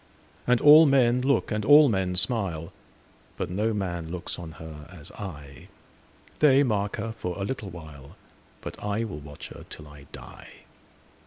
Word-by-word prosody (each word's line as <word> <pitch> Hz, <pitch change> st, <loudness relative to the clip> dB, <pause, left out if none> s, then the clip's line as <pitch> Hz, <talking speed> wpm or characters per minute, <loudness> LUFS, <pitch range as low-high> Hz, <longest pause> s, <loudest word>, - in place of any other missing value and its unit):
And 125 Hz, -1 st, +4 dB
all 150 Hz, +2 st, +8 dB
men 125 Hz, -3 st, +3 dB
look, 135 Hz, -1 st, +1 dB
and 105 Hz, -1 st, -1 dB
all 145 Hz, +5 st, +7 dB
men 95 Hz, -5 st, -1 dB
smile, 95 Hz, -5 st, 0 dB, 0.6 s
But -, -, -4 dB
no 105 Hz, +5 st, 0 dB
man 90 Hz, -6 st, -4 dB
looks 90 Hz, 0 st, -5 dB
on 80 Hz, -2 st, -8 dB
her 75 Hz, 0 st, -11 dB
as 85 Hz, -6 st, -11 dB
I:They 95 Hz, -, -2 dB
mark 105 Hz, -5 st, -1 dB
her 115 Hz, +1 st, -4 dB
for 90 Hz, -5 st, -6 dB
a 100 Hz, -, -3 dB
little 105 Hz, -3 st, -5 dB
while, 80 Hz, -6 st, -12 dB, 0.5 s
But -, -, -9 dB
I 105 Hz, +2 st, -1 dB
will 100 Hz, -10 st, -6 dB
watch 75 Hz, 0 st, -10 dB
her -, -, -11 dB
till 75 Hz, -, -10 dB
I 75 Hz, -1 st, -15 dB
die. -, -, -13 dB
95 Hz, 160 wpm, -26 LUFS, 80-115 Hz, 0.6 s, all